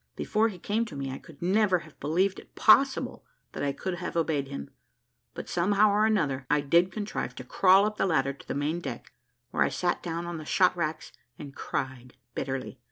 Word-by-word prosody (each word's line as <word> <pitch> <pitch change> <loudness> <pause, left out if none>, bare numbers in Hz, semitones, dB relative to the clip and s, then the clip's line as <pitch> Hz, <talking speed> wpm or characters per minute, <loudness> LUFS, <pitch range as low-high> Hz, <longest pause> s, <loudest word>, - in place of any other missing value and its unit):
Before 220 +1 +1
he 205 -5 -6
came 210 +6 -1
to 165 - -9
me, 135 -1 -4
I 135 - -6
could 160 0 -13
never 190 +1 +3
have 155 - -18
believed 185 +6 +1
it - - -18
possible 265 +5 +4 0.3
that - - -6
I 140 - +1
could 175 +4 -4
have 175 -1 -4
obeyed 155 -4 0
him; 70 - -7 0.6
but - - -6
somehow 200 +4 +3
or 210 +2 +3
another 140 - 0
I 150 0 +3
did 170 +6 +3
contrive 205 - -4
to 130 - -7
crawl 190 +9 +5
up 210 0 -2
the - - +1
ladder 140 -5 +1
to 140 - -16
the - - -3
main 150 +4 -1
deck, 125 -8 -7 0.4
where - - -1
I - - +4
sat 175 -1 -1
down 170 0 -4
on 170 -1 -4
the - - -7
shot 185 +4 +3
racks 155 -2 -3 0.3
and 140 -2 -9
cried 130 -2 -4 0.2
bitterly. 135 0 -4
170 Hz, 210 wpm, -28 LUFS, 140-195 Hz, 0.6 s, crawl